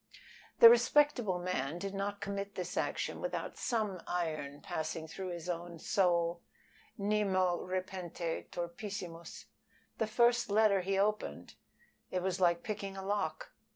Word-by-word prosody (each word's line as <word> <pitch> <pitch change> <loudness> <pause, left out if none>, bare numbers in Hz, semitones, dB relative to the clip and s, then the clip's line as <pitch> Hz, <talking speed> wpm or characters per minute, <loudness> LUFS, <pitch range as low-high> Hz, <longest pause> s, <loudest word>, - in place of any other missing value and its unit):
The 230 - +13
respectable 240 -4 +4
man 175 -4 -2
did 195 +2 -4
not 200 +1 -3
commit 200 0 -4
this 180 - -4
action - - -2
without - - -3
some 215 -7 -1
iron 155 -5 -2
passing 160 0 -4
through 185 +3 -6
his 170 -1 -6
own 175 -1 -4
soul 170 -1 +1 0.6
Nemo 195 -3 +2
repente 185 -2 -4
turpissimus. 175 -1 -6 0.5
The 220 - +1
first 240 +1 +3
letter 205 -2 +4
he 195 +1 0
opened 210 +2 -1 0.6
it 180 -1 -2
was 190 0 -1
like 170 -1 +3
picking 200 -2 -4
a 190 - -6
lock. 195 -6 -2
185 Hz, 130 wpm, -33 LUFS, 170-205 Hz, 0.6 s, The